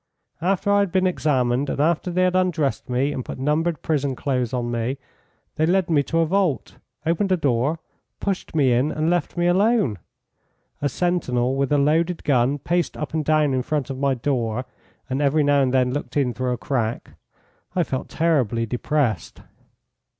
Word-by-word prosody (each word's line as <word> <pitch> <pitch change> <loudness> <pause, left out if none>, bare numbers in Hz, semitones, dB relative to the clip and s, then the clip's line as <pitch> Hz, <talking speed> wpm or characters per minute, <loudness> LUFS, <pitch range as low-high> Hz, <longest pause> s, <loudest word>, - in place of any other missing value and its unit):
After 195 +3 +1
I 205 - +4
had 200 -3 +1
been 185 +1 +2
examined, 135 -6 +1
and - - -3
after 165 +4 +1
they 180 +1 +1
had 185 0 +2
undressed 175 -9 0
me 130 +3 +1
and 130 - -4
put - - -7
numbered 150 +4 0
prison 140 -4 0
clothes 125 -3 -1
on 120 -2 -2
me, 120 +3 -2 0.6
they 155 - +2
led 185 0 +2
me 150 -3 +4
to 165 - -2
a - - +3
vault, 180 -4 0 0.3
opened 180 +4 +1
a 185 - +4
door, 140 +1 +1 0.4
pushed 195 -4 -3
me 135 -5 +4
in, 130 +5 +2
and 155 +2 0
left 175 0 -1
me 175 - +1
alone; 185 - +2 0.8
a 145 - +1
sentinel, 135 -9 0
with 140 0 0
a 145 - +4
loaded 165 +5 +1
gun, 135 0 +2
paced 170 +4 -1
up 150 -1 -5
and 160 -1 0
down 155 -2 +2
in 130 - +1
front 145 0 -2
of 130 - -6
my 140 -1 +1
door, 125 -2 -1 0.4
and 130 +2 -2
every 145 +2 +3
now 145 0 +3
and 130 -2 +2
then 125 -1 +2
looked 145 +1 -4
in 130 -4 +1
through 125 +3 -2
a - - -3
crack 120 -2 -2 0.6
I 180 - +3
felt 130 -4 -4
terribly 130 -9 +1
depressed. 125 0 -1
145 Hz, 185 wpm, -23 LUFS, 130-170 Hz, 0.8 s, I